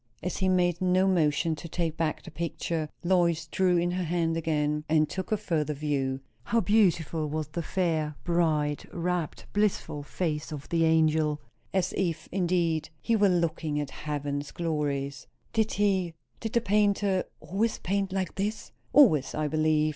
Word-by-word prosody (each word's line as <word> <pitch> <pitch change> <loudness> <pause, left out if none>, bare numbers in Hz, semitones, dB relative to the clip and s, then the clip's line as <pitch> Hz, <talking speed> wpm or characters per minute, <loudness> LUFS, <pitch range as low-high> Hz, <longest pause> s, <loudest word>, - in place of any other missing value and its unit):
As 180 - -2
he 190 -1 +1
made 175 -1 +2
no 185 +1 +3
motion 160 -2 +2
to 170 +2 -8
take 165 -2 -1
back 160 -2 -1
the - - -10
picture, 160 0 -3
Lois 170 -2 +2
drew 185 -2 +2
in 175 +1 +1
her 180 +1 -1
hand 165 -1 0
again 150 -2 0
and 155 -1 +4
took 190 +5 -5
a 215 - +3
further 155 -7 -1
view. 135 -2 -1 0.2
How 235 - +2
beautiful 175 -7 +2
was 155 0 -3
the 170 - -3
fair, 160 -3 -1
bright, 155 -4 +1
rapt, 175 -2 -2
blissful 205 -7 0
face 150 +1 -3
of 145 -2 -6
the 165 -1 +2
angel! 155 -2 +3 0.3
as 190 -1 0
if, 170 -4 -1
indeed, 170 -4 +1
he 230 - +1
were 205 -2 +4
looking 165 -4 0
at 145 -2 -3
heaven's 145 0 -3
glories. 145 -5 -2 0.3
"Did 220 -1 +1
he 190 -5 +1 0.2
did 225 -1 -4
the 235 - +3
painter 205 -2 +2
always 215 +4 -1
paint 195 +1 -1
like 190 -1 -2
this?" 210 +3 -3 0.2
"Always, 175 - +5
I 155 - 0
believe. 155 0 +2
170 Hz, 160 wpm, -28 LUFS, 150-185 Hz, 0.3 s, Always